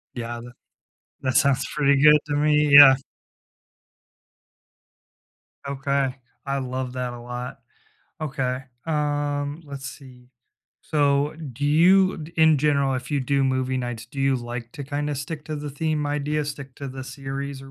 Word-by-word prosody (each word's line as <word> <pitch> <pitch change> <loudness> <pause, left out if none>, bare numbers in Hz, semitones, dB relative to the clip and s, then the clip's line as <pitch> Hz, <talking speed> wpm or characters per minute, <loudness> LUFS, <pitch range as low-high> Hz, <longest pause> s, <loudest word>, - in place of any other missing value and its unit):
Yeah, 120 0 -5
that 120 0 -11 0.7
that 130 -1 -1
sounds 140 -3 +3
pretty 140 -2 +3
good 150 0 +7
to 145 - -1
me, 150 0 +3
yeah. 140 -2 +11 2.7
Okay. 140 -1 -1 0.3
I 140 0 -1
love 130 -1 -4
that 125 -1 -3
a 120 - -9
lot. 125 +1 -7 0.6
Okay, 135 -3 -2 0.2
um, 145 0 -1
let's 140 -2 -8
see. 125 -3 -14 0.5
So, 145 -1 +1 0.2
do 145 +5 -4
you, 185 +6 +5
d 160 +1 -9
in 160 -2 +5
general, 140 -2 +2
if 130 +3 -5
you 140 - +1
do 140 +1 +1
movie 130 0 0
nights, 120 -3 -4
do 135 +3 -7
you 135 0 +3
like 120 -1 -6
to 140 - -7
kinda 145 +1 -3
stick 150 +2 -6
to 155 - -5
the 145 -1 -5
theme 155 +1 -1
idea, 150 +1 -1
stick 140 -2 -7
to 140 -1 -6
the 130 0 -7
series 135 +1 -6
or 135 - -12
140 Hz, 155 wpm, -24 LUFS, 130-150 Hz, 2.7 s, yeah